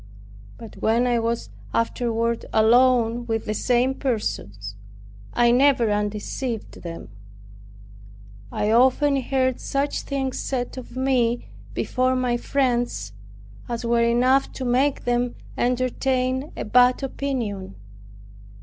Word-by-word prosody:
But 225 -2 -11
when 230 +3 +2
I 240 -1 +2
was 230 0 -2 0.2
afterward 230 0 0
alone 240 +1 +4
with 225 -1 -1
the 215 - -1
same 250 +4 +2
persons, 100 - -3 0.6
I 240 0 +3
never 250 -3 +4
undeceived 210 +3 -3
them. 165 -7 -8 1.4
I 210 - 0
often 265 +4 +4
heard 260 -1 0
such 280 +1 -1
things 270 -2 -3
said 245 -2 -3
of 255 0 -9
me, 250 -3 +1 0.3
before 255 0 +1
my 250 -1 +1
friends, 240 - -1 0.6
as 235 0 -3
were 235 0 +2
enough 250 +3 +3
to 260 - -5
make 265 +3 +1
them 245 0 0 0.2
entertain 255 +2 0
a - - -3
bad 250 +4 +4
opinion. 235 - -3
245 Hz, 115 wpm, -23 LUFS, 230-260 Hz, 1.4 s, alone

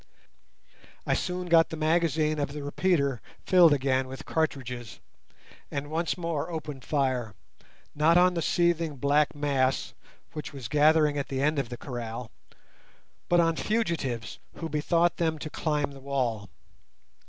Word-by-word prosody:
I - - +1
soon 180 -1 -2
got 165 -1 +5
the 160 - -6
magazine 155 -1 +1
of 145 -1 -2
the 145 -1 -6
repeater 145 -4 0 0.2
filled 180 -3 +6
again 130 -2 +1
with 130 +1 -8
cartridges, 125 -7 -3 0.7
and 145 +1 -5
once 165 +3 -1
more 165 -3 -2
opened 150 -5 -6
fire, 130 -8 -1 0.6
not 160 +3 +4
on 180 0 +5
the 170 - -1
seething 170 -2 +1
black 145 +3 +2
mass 135 -3 0 0.4
which 150 -1 -6
was 135 -5 -6
gathering 150 +2 +4
at 140 - -3
the 135 - -3
end 150 0 +2
of 130 -4 -3
the 120 - -6
kraal, 120 -2 -6 1.0
but 175 - +4
on 165 -1 +3
fugitives 165 - -2 0.2
who 165 - -5
bethought 165 +3 +1
them 160 -2 0
to 155 0 -7
climb 150 -3 -1
the 140 - -11
wall. 125 -7 -2
150 Hz, 145 wpm, -27 LUFS, 135-165 Hz, 1.0 s, filled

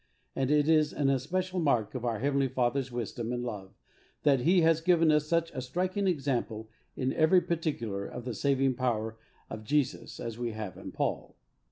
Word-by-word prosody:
And 135 -1 0
it 150 0 +3
is 155 -2 +3
an 140 -2 +2
especial 185 +8 -1
mark 125 -10 +1
of 125 -2 -5
our 115 -2 0
Heavenly 140 +2 +1
Fathers 130 +1 0
wisdom 120 0 -4
and 120 0 -2
love 100 -5 -6 0.5
that 140 -3 +4
He 175 +8 +4
has 165 0 +3
given 165 -2 +4
us 150 0 +2
such 165 0 +1
a 130 - -4
striking 185 +9 -1
example 125 - -1 0.2
in 130 -1 -1
every 160 +3 +5
particular 120 - -2
of 125 - -8
the 125 - -3
saving 135 +2 +1
power 115 -3 -2 0.3
of 110 0 -7
Jesus 140 +2 -1
as 115 -1 -5
we 120 -2 -2
have 110 -3 -6
in - - -8
Paul. - - -3
135 Hz, 185 wpm, -30 LUFS, 120-155 Hz, 0.5 s, every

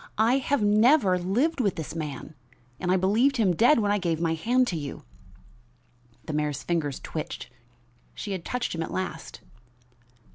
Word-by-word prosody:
I 230 +5 +3
have 275 -2 0
never 210 -2 +4
lived 245 - 0
with 200 -6 0
this 160 -1 -6
man, 150 -2 -6 0.5
and 180 - -1
I 185 - +4
believed 225 +9 +2
him 195 -6 +2
dead 245 - +5
when 205 -3 +1
I 205 - +2
gave 170 -4 -1
my 165 -1 +1
hand 245 +10 +2
to 175 - -3
you." 145 -3 -6 1.2
The 155 - -5
mayor's 150 -2 -2
fingers 155 -5 -1
twitched. 155 -5 -6 0.6
She 205 - -6
had 185 -3 -4
touched 250 +6 -3
him 165 - -3
at 160 - -3
last. 165 -3 -5
185 Hz, 170 wpm, -26 LUFS, 160-230 Hz, 1.2 s, dead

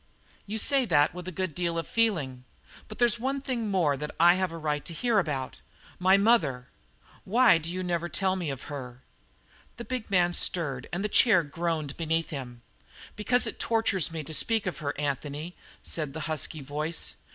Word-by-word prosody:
"You 215 +2 -3
say 270 +3 +2
that 155 -7 +3
with 180 0 -8
a - - -3
good 185 -2 -3
deal 170 0 -1
of 165 - -2
feeling. 155 - 0 0.4
But 215 - -10
there's 235 -2 +3
one 270 +3 -1
thing 245 -5 -3
more 170 -8 +2
that 150 +2 -4
I 170 +1 +7
have 185 -1 0
a 165 - -6
right 150 -2 -2
to 165 - -7
hear 235 +3 +2
about. 140 -7 -3 0.4
My 190 +2 +5
mother! 155 - +2 0.5
Why 225 -4 +5
do 165 +1 -5
you 185 +1 -3
never 175 -1 -1
tell 190 +2 +1
me 175 -5 -3
of 135 -1 -5
her?" 130 -4 -8 0.7
The 235 - -7
big 255 -4 -4
man 175 -3 +3
stirred 140 -9 0
and 190 +4 -2
the - - +2
chair 210 -4 +5
groaned 155 -1 -3
beneath 165 0 -1
him. 125 -5 -7 0.5
"Because 245 +4 +2
it - - -5
tortures 225 -7 +1
me 160 -2 -4
to 155 - -8
speak 220 +6 +2
of 185 - -3
her, 145 -2 -3
Anthony," 145 +3 -3 0.3
said 150 -4 -3
the 160 - -5
husky 155 0 -4
voice. 150 +4 -4
170 Hz, 190 wpm, -28 LUFS, 150-200 Hz, 0.7 s, I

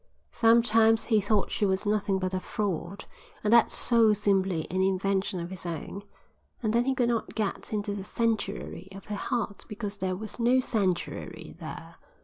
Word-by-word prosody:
Sometimes 225 -1 +5
he 220 -3 +2
thought 205 0 +1
she - - -1
was 190 +1 +1
nothing 205 -2 +1
but 185 0 -2
a 185 - 0
fraud, 190 -2 -3 0.4
and 215 +1 +3
that 235 -1 +6
soul 225 -3 +3
simply 190 -5 +1
an 185 +1 0
invention 190 0 0
of 170 +1 -6
his 190 - -5
own, 170 +3 -5 0.6
and 215 -1 +1
that 240 +2 +2
he 265 - +2
could 245 -2 +2
not 230 -2 -2
get 215 -3 -2
into 205 -1 -2
the 200 -1 -5
sanctuary 210 -5 -2
of 195 - -10
her 210 - -4
heart 205 -1 -3
because 205 -1 -5
there 185 -1 -1
was 215 +5 -7
no 245 +2 +4
sanctuary 200 -8 -2
there. - - -8
205 Hz, 175 wpm, -28 LUFS, 190-225 Hz, 0.6 s, that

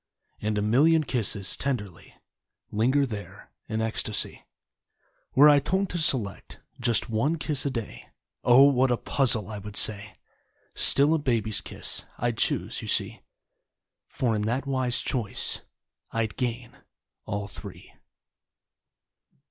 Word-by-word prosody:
And 105 0 -1
a 105 - 0
million 155 +9 +4
kisses 110 -7 -2
Tenderly 105 -10 -4 0.6
Linger 130 +7 +2
there 105 -5 -9 0.2
in 110 0 -1
ecstacy. 110 -1 -2 0.9
Were 145 +3 +8
I 145 -1 +7
told 190 +7 -1
to 175 - -3
select 120 - -1 0.2
Just 120 -2 +2
one 115 +9 +1
kiss 150 -3 -1
a - - +1
day; 115 -5 -6 0.3
Oh! 125 +2 +7
What 130 -2 +4
a 120 - +2
puzzle 115 -8 +2
I 105 - -5
would 105 +1 -9
say. 105 -2 +2 0.6
Still 145 +3 +4
a 160 - +2
baby's 115 -6 -1
kiss - - -3
I'd 120 -1 -2
choose, - - -1
you - - -7
see, - - -1 0.9
For 120 -4 -1
in 105 - -1
that 125 +5 -1
wise 130 -3 0
choice 115 -6 -2 0.5
I'd 115 -1 -2
gain 120 -1 -4 0.5
ALL 100 -2 -3
Three. - - -10
120 Hz, 130 wpm, -26 LUFS, 105-140 Hz, 0.9 s, Were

